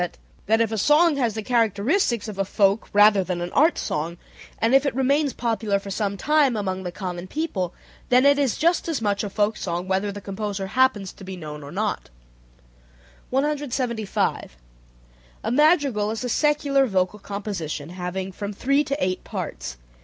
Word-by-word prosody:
that 220 +2 +3
if 230 -1 +1
a 220 - -1
song 300 - +4
has 235 -5 0
the 220 - -3
characteristics 230 - +1
of 205 -2 -7
a - - +3
folk 200 +2 +1
rather 205 -1 +6
than 180 -1 -3
an 175 0 -4
art 315 +4 +4
song, 165 +3 -3 0.4
and 225 +3 +1
if 270 0 +6
it 280 - -1
remains 275 +2 +2
popular 220 -4 -1
for 195 0 -7
some 200 0 -2
time 295 +1 +3
among 190 -2 -2
the 180 -1 -5
common 180 -1 -5
people, 200 - -2 0.4
then 250 +2 +5
it 285 0 +5
is 270 -5 +1
just 340 +2 +2
as 325 -4 -1
much 205 -2 0
a 205 - -3
folk 210 +2 0
song 175 -2 -3
whether 190 +2 0
the 205 - -7
composer 200 0 -4
happens 210 -2 +1
to - - -13
be 190 0 -7
known 150 -3 -7
or 140 0 -9
not. 210 +3 -2 1.2
175. 255 - -1 0.9
A - - -1
madrigal 280 -7 +3
is 225 +2 -3
a 250 - -2
secular 285 0 +2
vocal 190 0 0
composition 195 -8 -5
having 185 +1 -4
from 200 +2 -5
three 275 +7 +2
to 280 -1 -2
eight 185 -8 -1
parts. - - -5
210 Hz, 175 wpm, -24 LUFS, 190-265 Hz, 1.2 s, rather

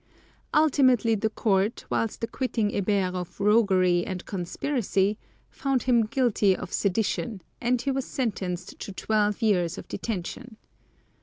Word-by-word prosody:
Ultimately 260 -7 +4
the 220 +1 0
Court, 210 -1 0
whilst 225 0 -1
acquitting 230 -2 -1
Hébert 195 -2 0
of 180 0 -6
roguery 190 -4 +3
and 185 0 -5
conspiracy, 200 +1 -1 0.3
found 270 -2 -1
him 235 -4 +3
guilty 225 -6 +2
of 180 - -7
sedition, 205 0 -1 0.2
and 245 +1 +1
he 275 +3 -1
was 270 0 -2
sentenced 185 -8 -3
to - - -6
twelve 210 +2 0
years 180 -6 +2
of - - -8
detention. 220 +3 -5
210 Hz, 130 wpm, -26 LUFS, 190-240 Hz, 0.3 s, Ultimately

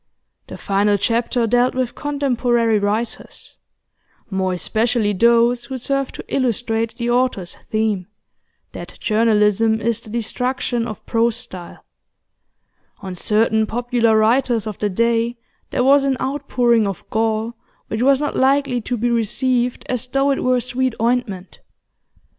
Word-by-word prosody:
The - - -8
final 205 +1 +1
chapter 230 +3 0
dealt 245 +3 +2
with 255 -2 -1
contemporary 245 -6 0
writers, 210 +3 -4 0.7
more 190 -1 0
especially 220 +3 0
those 235 +3 +3
who 260 +2 -5
served 275 +2 -2
to - - -8
illustrate 230 -3 -1
the 240 0 -2
author's 245 -8 0
theme 215 -4 -1 0.6
that - - -9
journalism 220 0 +2
is 230 +1 -1
the 220 - -12
destruction 240 +1 -2
of 215 - -8
prose 230 0 +1
style: 185 -8 -6 1.2
on 190 -1 -6
certain 220 +3 +1
popular 235 -1 +1
writers 230 0 +2
of 215 -3 -6
the 210 - 0
day 230 +3 0 0.3
there 250 - 0
was 275 +2 +5
an 270 -1 0
outpouring 250 -5 +1
of 195 -3 -6
gall 225 +1 0 0.3
which 220 - -3
was 270 +1 +4
not 295 0 -2
likely 270 -2 +2
to 245 +2 -3
be 240 +2 0
received 240 +2 0
as 250 -1 -2
though 275 +2 +1
it 270 - -1
were 255 0 +2
sweet 255 0 -1
ointment. 230 -6 -2
235 Hz, 135 wpm, -20 LUFS, 220-250 Hz, 1.2 s, was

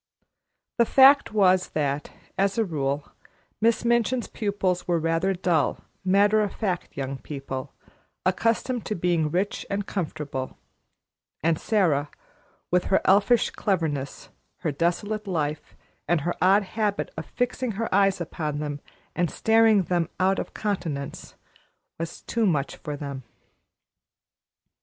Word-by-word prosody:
The 235 - +6
fact 275 +3 +6
was 185 -3 +3
that, 145 -1 -1 0.3
as 195 +1 +1
a 225 - +2
rule, 145 -4 -2 0.5
Miss 230 +1 +2
Minchin's 235 +1 +2
pupils 195 -4 -2
were 175 -1 +2
rather 165 +4 +1
dull, 175 -5 0 0.2
matter 205 +3 +4
of 205 - -2
fact 185 -5 -3
young 135 0 -3
people, 135 -2 -6 0.5
accustomed 230 +5 +1
to 215 - -1
being 170 -3 +1
rich 190 +6 -1
and 200 0 -2
comfortable; 150 -9 -4 0.9
and 160 -1 +2
Sara, 160 -10 +2 0.6
with 180 0 +2
her 190 - +3
elfish 205 +5 +4
cleverness, 160 -9 -2 0.3
her 165 -4 0
desolate 200 +8 -1
life, 155 -5 -3 0.3
and 170 -1 +2
her 175 +4 -1
odd 195 +3 +5
habit 210 0 -2
of - - -6
fixing 245 -1 -2
her 225 +3 -2
eyes 195 -1 +3
upon 155 -3 -3
them 145 -1 -4 0.3
and 175 -2 +1
staring 220 -1 +4
them 175 -2 0
out 190 +1 +2
of - - -6
countenance, 165 -10 -4 0.6
was 165 -1 -5
too 230 -2 0
much 145 -6 0
for 150 -1 -6
them. 140 -2 -6
180 Hz, 130 wpm, -25 LUFS, 150-210 Hz, 0.9 s, The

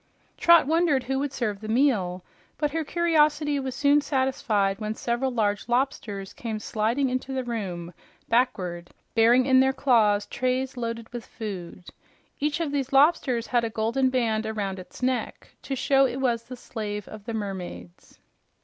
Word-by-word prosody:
Trot 340 -3 +6
wondered 315 -3 +2
who 265 +1 -1
would 285 0 -2
serve 215 -7 -2
the 215 - -7
meal, 215 -8 +1 0.3
but 295 -1 0
her 325 +1 -1
curiosity 300 -3 +2
was 265 -1 -4
soon 285 +2 +4
satisfied 255 -8 0
when 215 0 -3
several 240 +4 -1
large 215 -3 -1
lobsters 225 -6 -1
came 225 -2 -4
sliding 225 +6 0
into 255 +1 -3
the 260 -1 -1
room 185 -8 -5 0.3
backward, 185 -8 0 0.2
bearing 235 +3 +5
in 260 -1 +5
their 265 0 +4
claws 220 -7 +3
trays 255 +1 -1
loaded 230 -2 -4
with 240 -1 -6
food. 185 -5 -7 0.5
Each 295 +2 0
of 325 -4 -1
these 275 -2 -2
lobsters 270 -4 +3
had 240 -2 +1
a 230 - -1
golden 230 +4 +1
band 230 -4 +1
behind 205 -3 -3
its 185 +7 -11
neck 255 -1 -2
to 270 - -4
show 270 +1 +3
it 255 - -5
was 235 -3 0
the 250 +1 -9
slave 210 -4 -5
of 215 -2 -10
the 230 - -4
mermaids. 180 - -7
240 Hz, 165 wpm, -26 LUFS, 215-270 Hz, 0.5 s, Trot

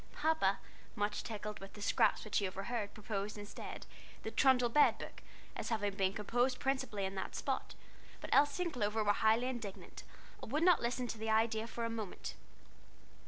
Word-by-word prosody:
Papa, 300 -11 +2 0.4
much 205 -1 -1
tickled 210 -1 -5
with 195 0 -10
the 210 - -10
scraps - - +3
which 215 - +1
he 200 - 0
overheard, 200 +3 -3
proposed, 210 -1 -3
instead, 205 0 -7 0.4
"The 220 - -3
Trundle 255 -2 +5
Bed 295 +5 +5
Book," - - -8 0.3
as - - -4
having 205 -3 0
been 195 -1 +1
composed 245 +5 +1
principally 260 -7 -1
in 190 - -3
that 190 - -4
spot, - - -2 0.4
but - - -8
Elsie 290 +5 +4
and 345 - -3
Clover 220 -3 0
were 205 0 +4
highly 220 +3 +3
indignant, 235 -6 -5 0.4
and - - -7
would 305 +4 +2
not 355 -2 +6
listen 245 +1 -1
to 230 -2 -5
the 220 0 -2
idea 220 0 +2
for 235 0 -3
a - - -1
moment. 220 -4 -5
220 Hz, 180 wpm, -35 LUFS, 205-245 Hz, 0.4 s, not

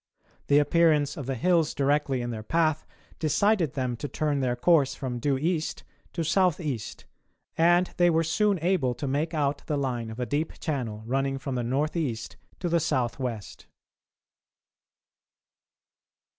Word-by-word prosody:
The 145 - +5
appearance 150 -1 +3
of 140 -4 -6
the 135 - -1
hills 165 +4 +2
directly 140 -2 +1
in 120 - -3
their 110 -2 -5
path 155 +5 0 0.3
decided 165 - +2
them 130 -3 -2
to 145 - -4
turn 145 +1 -1
their 125 -2 0
course 140 +1 +3
from 125 -3 -4
due 140 +2 +1
east 160 +2 -2 0.3
to 170 - -2
south 175 0 +2
east, 140 - -5 0.5
and 175 +2 +4
they 175 0 +5
were 165 0 +2
soon 200 +5 +2
able 170 -9 +1
to 140 - -4
make 150 +5 -1
out 145 -1 0
the 150 - 0
line 125 -5 -2
of 110 +2 -8
a 125 - -1
deep 145 +5 -2
channel 120 -8 -3
running 135 +2 0
from 135 0 -5
the 125 - -1
north 135 +7 -1
east 120 -9 -3 0.3
to 180 - -1
the 170 0 +2
south 130 -7 -1
west. 115 -6 -5
145 Hz, 160 wpm, -27 LUFS, 130-165 Hz, 0.5 s, The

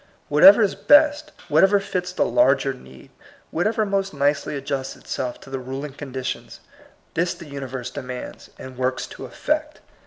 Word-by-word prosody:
Whatever 195 +9 +8
is 200 - +1
best, 300 +1 +4 0.2
whatever 195 +7 +4
fits 180 -2 -3
the 185 - +1
larger 300 - +3
need, 65 - -15 0.4
whatever 215 +6 0
most 195 -4 -1
nicely 145 +1 0
adjusts 135 -1 -4
itself 125 -1 -5
to 135 - -13
the 135 - -3
ruling 135 +3 -6
condi 130 -2 -7
tions, - - -5 0.5
this 170 +1 0
the 170 - -11
universe 130 -4 -6
demands, 125 -1 -7
and 130 -1 -10
works 130 0 -1
to - - -9
effect. 305 0 -2
145 Hz, 155 wpm, -23 LUFS, 130-195 Hz, 0.5 s, Whatever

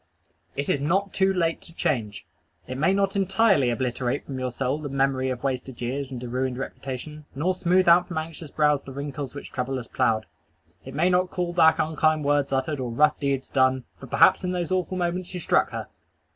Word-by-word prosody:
It 140 - -2
is 140 - +1
not 190 +7 0
too 190 0 +3
late 170 -3 0
to 165 - -14
change. 110 -11 -2 0.4
It 130 +1 -6
may 165 +6 +3
not 195 0 +1
entirely 195 - +3
obliterate 125 +2 -1
from 135 -2 -5
your 130 0 -1
soul 135 +4 -1
the 150 -2 -5
memory 135 -1 +1
of 125 -1 -4
wasted 130 -2 -3
years 130 +3 -3
and 125 -2 -6
a - - -4
ruined 130 +1 -2
reputation, 135 +3 -6
nor 170 +7 +1
smooth 185 0 +2
out 175 +1 +6
from 175 - -5
anxious 160 -1 -5
brows 150 -1 +2
the 135 - -10
wrinkles 140 0 -5
which 140 - -8
trouble 130 +1 -2
has 120 -2 -6
ploughed. 115 -4 +1 0.6
It 135 - -9
may 175 +5 +3
not 180 0 +2
call 175 -1 -2
back 160 -2 +5
unkind 155 -1 +1
words 145 -1 +2
uttered 135 +2 -1
or 125 -2 -3
rough 150 +5 +3
deeds 140 -2 -1
done 130 -1 +3 0.2
for - - -10
perhaps - - +5
in 180 0 -1
those 175 0 -2
awful 185 0 0
moments 180 +1 -2
you - - -3
struck - - +2
her! - - -5
145 Hz, 210 wpm, -25 LUFS, 130-175 Hz, 0.6 s, out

